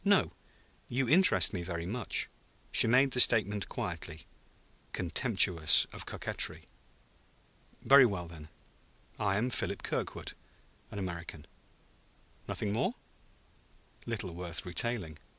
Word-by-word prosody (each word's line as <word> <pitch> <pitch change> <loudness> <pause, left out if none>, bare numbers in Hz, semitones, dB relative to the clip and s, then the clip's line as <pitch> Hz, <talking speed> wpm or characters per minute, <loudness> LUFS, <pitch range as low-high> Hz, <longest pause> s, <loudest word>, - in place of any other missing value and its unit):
"No; 200 -1 +2 0.6
you 130 +1 -2
interest 170 - +5
me 90 - -4
very 85 -1 -5
much." 110 +3 -2 0.4
She - - +6
made 130 +3 +3
the 125 - -1
statement 105 -5 +5
quietly, 80 -2 -7 0.7
contemptuous 90 -3 +2
of - - -9
coquetry. - - -2 1.2
"Very 135 -2 +7
well, 90 -5 -5
then; 80 -2 -12 0.7
I 100 -2 0
am 120 +4 -1
Philip - - -3
Kirkwood, - - -4 0.6
an 110 - -9
American." 85 -5 -7 1.0
"Nothing 100 - -2
more?" 110 - -1 1.1
"Little 105 -6 -5
worth 85 +2 -3
retailing." 90 -3 -3
100 Hz, 110 wpm, -30 LUFS, 85-120 Hz, 1.2 s, Very